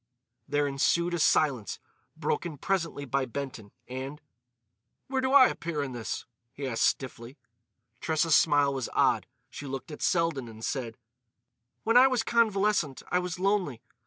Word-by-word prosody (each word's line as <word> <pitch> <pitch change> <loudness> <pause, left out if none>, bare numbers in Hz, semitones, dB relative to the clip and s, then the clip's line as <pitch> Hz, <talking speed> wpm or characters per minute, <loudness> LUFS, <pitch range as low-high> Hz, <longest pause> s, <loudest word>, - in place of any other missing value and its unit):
There 145 0 +1
ensued 170 +5 +1
a 175 - -1
silence, 135 - +2 0.4
broken 160 -4 -2
presently 165 -5 -2
by 135 +1 0
Benton; 125 -5 -6 0.2
and: 130 +4 -6 0.9
"Where 265 -1 0
do 260 0 0
I 275 -2 +9
appear 165 -4 -3
in 135 - -5
this?" 120 -3 -5 0.3
he 140 - -6
asked 120 -3 +1
stiffly. 130 0 -2 0.6
Tressa's 160 0 +2
smile 145 -3 +4
was 130 -3 -3
odd; - - +2 0.2
she 145 - -8
looked 135 +5 -6
at 150 - -9
Selden 165 -8 +1
and 110 0 -8
said: 120 -5 -3 0.9
"When 230 +2 +4
I 260 +2 +8
was 255 -4 +1
convalescent 210 - +1
I 180 - +3
was 180 -1 -4
lonely.... 185 - 0
145 Hz, 150 wpm, -28 LUFS, 130-180 Hz, 0.9 s, I